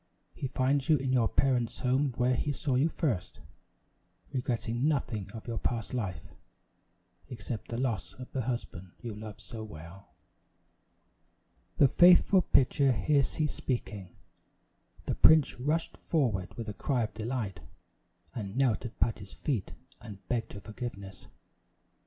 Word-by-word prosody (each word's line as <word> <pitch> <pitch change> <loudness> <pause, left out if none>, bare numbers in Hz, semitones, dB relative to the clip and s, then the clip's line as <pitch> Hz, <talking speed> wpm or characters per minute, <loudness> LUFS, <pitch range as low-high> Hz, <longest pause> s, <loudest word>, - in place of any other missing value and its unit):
He 135 - -4
finds 135 +2 +1
you 155 - +6
in 130 -1 -1
your 120 -3 +4
parents' 125 -3 +1
home 130 +1 +2
where 125 +1 +3
he 145 +4 0
saw 140 0 -2
you 135 +6 +3
first, 130 - -2 0.9
regretting 120 0 -1
nothing 115 -9 -1
of 110 -2 -9
your 115 -2 -3
past 115 -1 -2
life, 95 - -3 1.1
except 115 -2 -6
the 115 - -4
loss 120 -7 -2
of 125 -1 -10
the 130 - -1
husband 110 -7 -5
you 115 -2 -6
love 105 0 -8
so 115 -3 -8
well." 85 -1 -11 1.7
The 140 - +7
faithful 180 +5 +6
pitcher 140 -2 +3
here 145 +4 +3
ceased 150 +3 -1
speaking. 105 -8 -4 0.9
The - - 0
prince 155 -5 +5
rushed 155 +6 -1
forward 105 - -1
with 115 -1 -5
a 105 - -4
cry 125 +3 0
of 110 - -4
delight, 110 -4 -3 0.7
and 100 -3 -5
knelt 125 -6 +2
at 120 - -8
Patty's 100 -1 -1
feet 120 -11 -2 0.3
and 105 -4 -11
begged 120 -2 -2
her 100 - -8
forgiveness. 100 -3 -8
120 Hz, 140 wpm, -30 LUFS, 105-135 Hz, 1.7 s, The